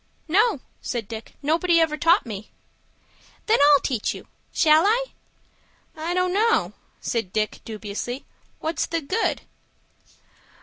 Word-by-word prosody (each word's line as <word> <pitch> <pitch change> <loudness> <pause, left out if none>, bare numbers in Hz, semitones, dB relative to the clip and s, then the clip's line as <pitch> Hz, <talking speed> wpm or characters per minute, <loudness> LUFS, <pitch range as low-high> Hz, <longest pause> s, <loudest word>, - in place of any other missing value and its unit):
"No," 400 - +3 0.2
said 235 -5 -3
Dick. 225 0 -8
"Nobody 335 +3 +3
ever 320 -2 +2
taught 335 +4 +3
me." 210 -2 -7 1.0
"Then 440 - +3
I'll 285 -1 +7
teach 245 -6 -1
you. - - -11 0.2
Shall 315 +2 +5
I?" 480 +4 +2 0.9
"I 325 +3 -3
don't 365 0 +1
know," 450 +3 +2 0.3
said 225 -6 -2
Dick, 215 0 -1
dubiously. 220 +4 -5 0.3
"What's 320 +1 -1
the 330 0 -1
good?" 375 +10 -1
310 Hz, 125 wpm, -24 LUFS, 235-360 Hz, 1.0 s, I'll